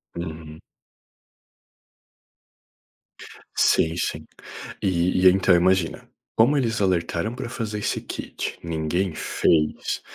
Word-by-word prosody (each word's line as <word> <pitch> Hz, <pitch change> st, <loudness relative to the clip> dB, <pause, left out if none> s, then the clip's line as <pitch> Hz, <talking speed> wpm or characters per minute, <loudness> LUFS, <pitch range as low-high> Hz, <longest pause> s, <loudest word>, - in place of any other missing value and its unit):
Uhum. 80 Hz, -2 st, -7 dB, 2.9 s
Sim, 80 Hz, 0 st, +3 dB
sim, -, -, -3 dB, 0.6 s
e 90 Hz, 0 st, +1 dB
e -, -, +11 dB
então 95 Hz, 0 st, +3 dB
imagina, 90 Hz, -1 st, +1 dB, 0.3 s
como 125 Hz, +7 st, +4 dB
eles 115 Hz, -5 st, 0 dB
alertaram 90 Hz, +3 st, 0 dB
para 125 Hz, -2 st, -5 dB
fazer 110 Hz, -4 st, -4 dB
esse -, -, -1 dB
kit, -, -, -6 dB
ninguém 85 Hz, +2 st, -1 dB
fez, 75 Hz, 0 st, 0 dB
90 Hz, 95 wpm, -24 LUFS, 85-105 Hz, 2.9 s, e